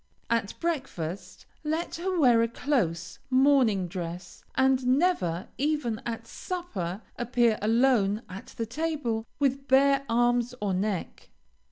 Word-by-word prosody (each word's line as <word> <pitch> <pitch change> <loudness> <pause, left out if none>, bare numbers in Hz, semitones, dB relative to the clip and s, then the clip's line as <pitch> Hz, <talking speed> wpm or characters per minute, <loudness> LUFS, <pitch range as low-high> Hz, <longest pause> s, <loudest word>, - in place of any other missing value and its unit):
At 230 -4 0
breakfast 255 - -4 0.2
let 315 +2 -2
her 365 +1 -1
wear 245 -6 +5
a 230 - +2
close, 180 - -1
morning 255 -8 +4
dress, 175 0 -7
and 265 0 +3
never, 200 - 0
even 280 -6 0
at 230 -1 -4
supper, 220 - -5 0.2
appear 240 -2 +2
alone 225 -1 +3
at 190 +4 -9
the 230 - -1
table 240 -4 -2
with 275 -1 0
bare 275 +1 +4
arms 240 +1 +2
or 200 -2 -1
neck. 190 -1 -3
240 Hz, 125 wpm, -27 LUFS, 200-275 Hz, 0.2 s, wear